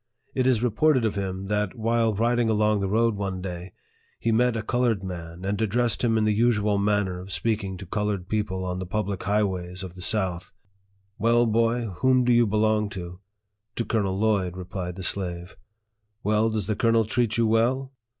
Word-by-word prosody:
It 130 -1 +1
is 120 -3 +2
reported 125 +2 +3
of 110 - 0
him, 95 -1 -4
that, 105 -1 -1
while 115 -1 +1
riding 120 +2 +1
along 105 -1 +2
the 100 -1 -1
road 115 +1 +2
one 95 -2 -3
day, 90 -1 -6 0.5
he 115 - 0
met 120 +1 +2
a 110 - -3
colored 115 -3 0
man, 85 -1 -7
and 100 +2 -1
addressed 115 +3 0
him 115 -2 +2
in 110 - +2
the 105 0 +2
usual 105 -2 +2
manner 100 -3 0
of 95 +2 -9
speaking 100 -2 -1
to 95 - -8
colored 105 -1 -2
people 100 -3 -2
on 90 0 -3
the 95 - -5
public 100 -1 -2
highways 95 -3 -1
of 90 -2 -7
the 90 - -10
south: 95 -3 0 0.7
"Well, 120 +2 +3
boy, 115 +2 +2 0.2
whom 130 -1 +4
do 125 0 +3
you 120 -1 +4
belong 105 0 +1
to? 90 0 -7 0.2
" 100 0 -54
" 110 +2 -56
To 115 - -2
Colonel 100 -4 0
Lloyd," 100 -4 +1
replied 90 -1 -5
the 95 - -7
slave. 90 -1 -2 0.3
" 105 0 -50
Well, 110 +2 +2
does 110 -3 -2
the 110 - -1
colonel 115 +1 +3
treat 115 0 0
you 115 - +3
well 125 +5 +1
105 Hz, 200 wpm, -25 LUFS, 95-115 Hz, 0.7 s, whom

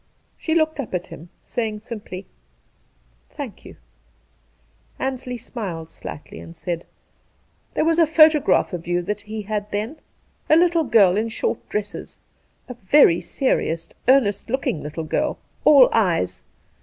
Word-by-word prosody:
She 320 - -2
looked 315 -2 +1
up 235 -8 -3
at 180 - -2
him, 170 +3 -11
saying 215 -3 -3
simply: 210 -5 -8 0.6
' - - -39
Thank - - -7
you.' - - -11 1.2
Ansley 260 -1 -3
smiled 185 -9 -6
slightly, 145 - -9
and 165 - -11
said: 170 0 -4 0.4
' - - -41
There - - +2
was 330 +1 +2
a 330 - +5
photograph 310 - +4
of 170 -1 -5
you 175 0 0
that 210 +3 -3
he 215 +1 -6
had 210 0 -3
then. 215 +9 -3 0.5
A 310 - +7
little 335 -1 +3
girl 205 -6 +5
in 225 +2 0
short 225 - -3
dresses, 210 -1 -5 0.5
a 250 - -6
very 215 - +4
serious, 165 -11 -1 0.2
earnest 235 -6 +3
looking 255 - -1
little, 150 +2 -5
girl 155 - -1
— - - -37
all 280 -4 +8
eyes. 165 - +1
215 Hz, 150 wpm, -22 LUFS, 175-265 Hz, 1.2 s, all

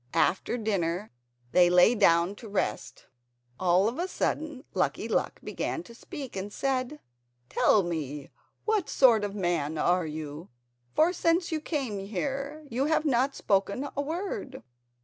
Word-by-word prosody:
After 195 +6 +2
dinner 200 -3 -1 0.4
they 175 -1 +6
lay 180 +6 +6
down 175 -4 +4
to 225 - -10
rest. 200 - -3 0.5
All 185 +2 +4
of 235 +7 -3
a 355 - 0
sudden 305 -6 -2
Lucky - - 0
Luck - - -1
began 335 - -3
to 235 - -13
speak 275 +2 -8
and 195 +2 -4
said: 270 +4 -1 0.5
"Tell 205 - +4
me, 150 -5 -4 0.3
what 430 -5 +1
sort 235 -6 +5
of 205 0 -3
man 170 -5 -1
are 175 +1 +2
you, 155 +1 -6 0.5
for 335 +3 +4
since 340 0 +1
you 315 -1 -1
came 270 - -2
here 275 +10 -4
you 260 +2 -1
have 315 0 +1
not 270 0 +2
spoken 200 +8 0
a 285 - 0
word?" 305 -4 -4
225 Hz, 150 wpm, -28 LUFS, 180-285 Hz, 0.5 s, they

